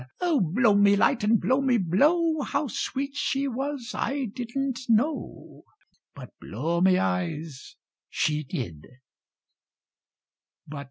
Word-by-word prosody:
O, 340 -5 +2
blow 205 +6 +3
me 200 0 +5
light 230 +3 +2
and 215 +1 +3
blow 260 +2 +1
me 260 -3 +2
blow, 300 - +2
How 280 +2 -1
sweet 275 +3 -4
she 280 -1 -1
was 270 -1 -4
I 275 -1 -2
didn't 255 +1 -3
know 250 +8 -1 0.5
But, - - -10
blow 170 +2 -2
me 185 0 +5
eyes, 110 - -3 0.3
she 150 0 0
did! 120 - -6
235 Hz, 115 wpm, -26 LUFS, 175-275 Hz, 0.5 s, me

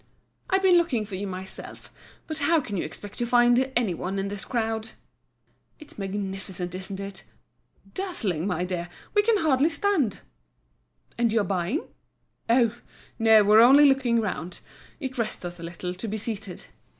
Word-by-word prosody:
"I've 385 0 +2
been 365 -2 +6
looking 255 -11 0
for 200 - -12
you 195 +2 -3
myself. 190 0 -8 0.3
But 315 -1 -5
how 320 +3 +3
can 210 -8 -5
you 180 - -1
expect 205 -1 -7
to 240 - +1
find 245 +2 +4
any 230 -7 +2
one 185 +3 -4
in 195 0 -2
this 205 0 -5
crowd?" 225 -2 -2 0.8
"It's 305 -8 -13
magnificent, 190 -2 -4
isn't 190 +1 -6
it?" 195 0 -7 0.7
"Dazzling, 220 - -2
my 180 -2 -1
dear. 175 -1 -4 0.2
We 415 - +5
can 435 +1 +3
hardly 305 -3 +3
stand." 325 - 0 1.0
"And 235 -2 +3
you're 220 -1 +2
buying?" 190 - -1 0.7
"Oh! 235 -1 +4 0.4
no, 220 -1 +6
we're 210 +2 +7
only 275 +5 +8
looking 265 -4 +3
round. 180 -5 -4 0.4
It 260 -4 -5
rests 215 -5 -3
us 175 0 -6
a - - -8
little 175 +1 -5
to 185 +5 -6
be 215 +1 -3
seated." 210 -4 -5
220 Hz, 160 wpm, -26 LUFS, 190-260 Hz, 1.0 s, only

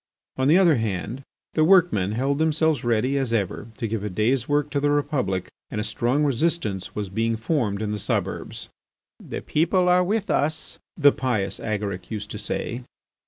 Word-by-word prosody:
On 130 0 +1
the 160 +5 +6
other 170 -7 +5
hand, 110 +3 -3 0.3
the 155 - +3
workmen 160 - +4
held 135 +5 0
themselves 160 -3 +2
ready, 125 +4 +1
as 130 -4 -2
ever, 105 -1 -1
to 115 - -2
give 110 -1 -3
a 105 - -2
day's 115 +7 0
work 145 0 +1
to 145 - +1
the 145 +1 +1
Republic, 130 - 0 0.2
and 105 - -4
a - - -1
strong 120 +6 0
resistance 140 - 0
was 105 -1 -2
being 115 +3 0
formed 110 -5 -1
in 105 - -2
the 105 - -2
suburbs. - - -3 0.5
"The - - -6
people 175 +4 +2
are 180 0 +5
with 205 +3 -1
us," 155 +2 -1 0.2
the 145 -3 +6
pious 115 -9 -1
Agaric 100 -4 -3
used 105 -2 -5
to 105 - -5
say. 120 +3 -3
125 Hz, 180 wpm, -24 LUFS, 105-150 Hz, 0.5 s, the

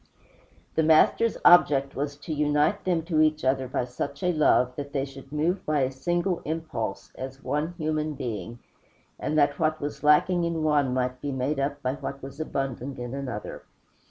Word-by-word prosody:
The 160 - +2
Master's 160 +8 +4
object 140 -6 +6
was 145 +1 -3
to 155 +2 -5
unite 150 +6 +1
them 175 -3 +1
to 160 -2 +1
each 155 -2 +2
other 130 0 +1
by 125 - -1
such 140 +4 -5
a 180 0 +2
love 125 -5 +3
that 140 0 -6
they 135 -2 0
should 135 0 -12
move 165 +5 0
by 150 -2 +1
a 130 0 +1
single 175 +6 -1
impulse, 115 -12 -4
as 135 +1 -8
one 155 +4 -2
human 155 -1 -1
being, 115 -4 -5 0.6
and 155 - -1
that 145 -1 +3
what 155 -1 +1
was 145 0 -5
lacking 170 +4 +4
in 165 -2 -1
one 145 -4 +2
might 125 0 -1
be 145 - -3
made 135 +2 -1
up 140 +1 -2
by 130 0 0
what 140 -1 -6
was 135 +2 -9
abundant 135 -3 -3
in 120 0 -5
another. 130 -6 -5
145 Hz, 185 wpm, -26 LUFS, 135-155 Hz, 0.6 s, object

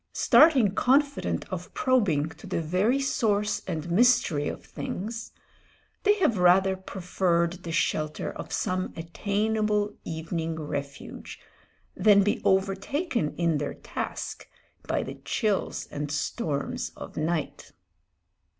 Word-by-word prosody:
Starting 265 - +5
confident 280 +5 +1
of 180 -1 -5
probing 200 - +2
to 160 - -12
the - - -1
very 185 - +1
source 210 -6 +1
and 170 -2 -3
mystery 195 -8 +3
of - - -6
things, 225 +4 -5 0.7
they 415 +1 +4
have 310 - +1
rather 190 +2 +5
preferred 180 -2 -1
the 170 - -6
shelter 155 -1 -1
of - - -8
some 185 0 -1
attainable 210 +4 0
evening 160 0 -3
refuge 140 -2 -6 0.6
than 205 -2 +5
be 205 - 0
overtaken 195 - 0
in 165 -3 +1
their 145 - -3
task - - -5 0.4
by - - 0
the - - -8
chills 215 -5 -1
and 145 0 -4
storms 145 0 -2
of - - -9
night. 155 0 -2
190 Hz, 115 wpm, -27 LUFS, 165-220 Hz, 0.7 s, Starting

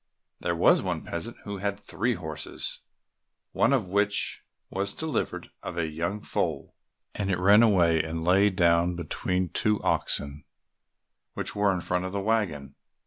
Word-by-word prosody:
There - - -1
was - - +5
one - - -3
peasant 95 +8 -5
who 100 -1 -5
had 100 +1 -2
three 115 +3 -1
horses, 80 -5 -5 0.7
one - - +2
of 120 -10 +1
which 100 +1 +1 0.3
was 100 +1 -2
delivered 160 -6 -3
of 85 - -6
a 85 - +1
young 85 +7 -3
foal, - - -2 0.4
and 100 -1 -2
it 95 - +1
ran 100 +4 +6
away 85 -8 +4
and 80 +1 -4
lay 95 +4 +4
down 85 -2 +3
between 90 +2 -2
two 105 +4 +1
oxen 70 0 0 0.9
which - - -2
were 100 -1 +3
in 90 -2 -2
front 90 +1 -1
of 95 - -5
the 100 - -1
waggon. 95 -10 -1
95 Hz, 155 wpm, -27 LUFS, 85-105 Hz, 0.9 s, ran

